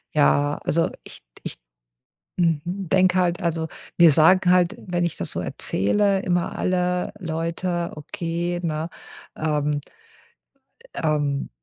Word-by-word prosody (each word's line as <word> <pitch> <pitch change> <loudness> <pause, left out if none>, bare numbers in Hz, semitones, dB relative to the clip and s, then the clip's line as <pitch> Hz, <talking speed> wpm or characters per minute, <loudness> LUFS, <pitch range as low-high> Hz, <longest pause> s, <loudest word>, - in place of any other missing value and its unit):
Ja, 145 0 +3
also 165 +2 +1
ich - - -11 0.2
d - - -18
ich - - -5 0.8
mhm, 165 -4 +2
denke 185 0 +2
halt, 175 +1 +1
also 165 -2 -1 0.3
mir 170 -3 +8
sagen 180 +5 +5
halt, 180 -1 +3
wenn 175 -1 -2
ich 170 - -2
das - - -3
so - - -2
erzähle, 195 - +1
immer 175 -2 -1
alle 180 -1 0
Leute: 170 +1 -2
„Okay, 170 +3 -3
ne, 160 0 -2 0.5
ähm“ 150 -2 0 1.1
„ähm, 145 -3 -1
170 Hz, 125 wpm, -23 LUFS, 155-180 Hz, 1.1 s, mir